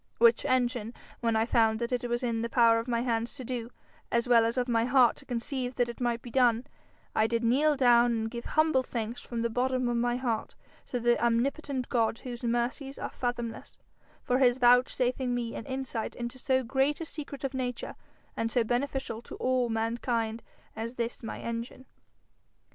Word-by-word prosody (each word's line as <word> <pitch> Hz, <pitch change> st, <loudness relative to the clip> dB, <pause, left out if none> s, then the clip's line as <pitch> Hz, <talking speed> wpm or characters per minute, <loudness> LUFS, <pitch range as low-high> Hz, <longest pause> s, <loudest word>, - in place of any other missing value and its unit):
Which 235 Hz, 0 st, +5 dB
engine 245 Hz, -3 st, 0 dB, 0.2 s
when 230 Hz, -1 st, +1 dB
I 220 Hz, 0 st, +3 dB
found 225 Hz, -2 st, +3 dB
that 235 Hz, +2 st, -3 dB
it 245 Hz, -1 st, -1 dB
was 240 Hz, +2 st, -1 dB
in 230 Hz, -2 st, 0 dB
the 230 Hz, -, -2 dB
power 230 Hz, -2 st, +5 dB
of 230 Hz, -, -5 dB
my 235 Hz, -1 st, 0 dB
hands 235 Hz, 0 st, -1 dB
to 265 Hz, -, -7 dB
do, 240 Hz, -1 st, -4 dB, 0.4 s
as 235 Hz, +1 st, +1 dB
well 235 Hz, -2 st, +6 dB
as 230 Hz, +2 st, -1 dB
of 250 Hz, 0 st, +1 dB
my 230 Hz, -1 st, +2 dB
heart 250 Hz, -1 st, +5 dB
to 280 Hz, -, -14 dB
conceive 250 Hz, +1 st, -3 dB
that 245 Hz, -1 st, +1 dB
it 235 Hz, -, -8 dB
might 235 Hz, -1 st, 0 dB
be 240 Hz, -, -9 dB
done, 245 Hz, -1 st, +3 dB, 0.5 s
I 220 Hz, -, +3 dB
did 230 Hz, +1 st, -1 dB
kneel 285 Hz, +6 st, +3 dB
down 240 Hz, -2 st, +5 dB
and 225 Hz, -1 st, -1 dB
give 235 Hz, -1 st, -6 dB
humble 310 Hz, -4 st, +3 dB
thanks 235 Hz, -2 st, -4 dB
from 235 Hz, -1 st, -4 dB
the 235 Hz, -, +1 dB
bottom 255 Hz, +1 st, 0 dB
of 240 Hz, -, 0 dB
my 240 Hz, +1 st, +1 dB
heart 235 Hz, -4 st, -2 dB, 0.3 s
to 245 Hz, -, -2 dB
the 240 Hz, 0 st, +2 dB
omnipotent 255 Hz, +3 st, 0 dB
God 230 Hz, -2 st, +1 dB
whose 245 Hz, 0 st, -8 dB
mercies 245 Hz, +4 st, -1 dB
are -, -, -5 dB
fathomless, 240 Hz, -2 st, -4 dB, 0.5 s
for 250 Hz, +1 st, +1 dB
his 250 Hz, -2 st, +4 dB
vouchsafing 250 Hz, 0 st, +3 dB
me 235 Hz, -1 st, -3 dB
an -, -, -7 dB
insight 260 Hz, -4 st, -4 dB
into 240 Hz, +2 st, -5 dB
so 260 Hz, 0 st, +1 dB
great 270 Hz, +4 st, +1 dB
a 330 Hz, -, -4 dB
secret 290 Hz, -3 st, -7 dB
of 270 Hz, 0 st, -2 dB
nature 250 Hz, -2 st, -3 dB, 0.4 s
and 225 Hz, 0 st, -1 dB
so 240 Hz, -, +2 dB
beneficial 245 Hz, -1 st, -2 dB
to -, -, -10 dB
all 255 Hz, -1 st, +1 dB
mankind 225 Hz, 0 st, -1 dB, 0.3 s
as 230 Hz, +2 st, -5 dB
this 235 Hz, 0 st, -3 dB
my 225 Hz, -, -6 dB
engine.' 235 Hz, +3 st, -5 dB
240 Hz, 195 wpm, -29 LUFS, 230-255 Hz, 0.5 s, well